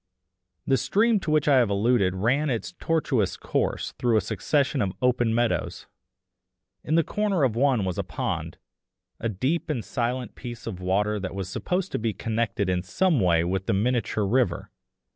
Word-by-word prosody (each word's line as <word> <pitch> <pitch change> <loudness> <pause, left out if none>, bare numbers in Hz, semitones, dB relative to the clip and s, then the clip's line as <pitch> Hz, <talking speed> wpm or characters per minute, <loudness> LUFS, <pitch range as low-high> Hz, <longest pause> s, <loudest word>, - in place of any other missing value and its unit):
The 135 - +3
stream 220 - +2
to 170 - -5
which 155 -1 +2
I 140 -2 +6
have 120 -4 +3
alluded 100 -2 +2
ran 130 +10 +1
its 115 -4 -2
tortuous 145 - 0
course - - -1
through 120 -3 +3
a - - +3
succession 140 +6 0
of 95 -2 -1
open 125 -2 +2
meadows. 120 +1 -1 1.0
In 155 - 0
the 165 - +4
corner 200 -3 0
of 120 -5 +2
one 125 -5 +2
was 90 -2 -3
a - - 0
pond, - - -4 0.6
a 115 - -1
deep 130 - -1
and 130 -7 -2
silent 125 -1 -2
piece 120 -1 -8
of 100 -6 -5
water 105 +3 0
that 95 0 -5
was 95 -2 -4
supposed 180 - -2
to - - -2
be 110 -1 -1
connected 110 -1 -1
in 90 -1 +1
some 155 - +1
way 85 -4 +3
with 95 +2 -2
the - - +2
miniature 110 0 0
river. 105 -4 0
120 Hz, 180 wpm, -25 LUFS, 100-140 Hz, 1.0 s, I